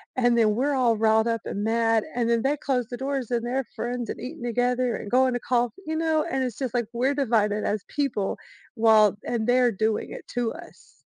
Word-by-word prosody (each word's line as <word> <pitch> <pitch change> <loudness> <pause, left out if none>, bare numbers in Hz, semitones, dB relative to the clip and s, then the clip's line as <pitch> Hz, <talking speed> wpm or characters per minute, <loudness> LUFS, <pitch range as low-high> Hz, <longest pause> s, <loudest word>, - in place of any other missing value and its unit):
and 245 -2 +3
then 215 -2 +3
we're 280 +4 +1
all 240 -4 +2
riled 220 +1 +3
up 230 -1 -1
and 205 - -3
mad 225 0 +2
and 235 -2 0
then 235 -1 +2
they 285 +3 +1
close 250 -5 -1
the 245 - -6
doors 270 -3 -3
and 240 -1 -1
they're 260 +1 -1
friends 240 0 -3
and - - -5
eating 280 +3 -7
together 245 +1 0
and 205 - -7
going 255 0 +3
to - - -1
coff 240 -2 0
you 315 0 -3
know? 315 -1 +1
And 265 -1 0
it's 245 -4 -4
just 260 -3 -3
like, 240 -2 0
we're 260 +4 +1
divided 215 -6 +1
as 205 -2 -1
people 275 -9 -2 0.4
while 215 -3 +5
and 230 -2 -1
they're 245 -1 +4
doing 220 +2 -1
it - - -9
to 240 -2 -2
us. 340 +1 -15
240 Hz, 220 wpm, -25 LUFS, 225-260 Hz, 0.4 s, while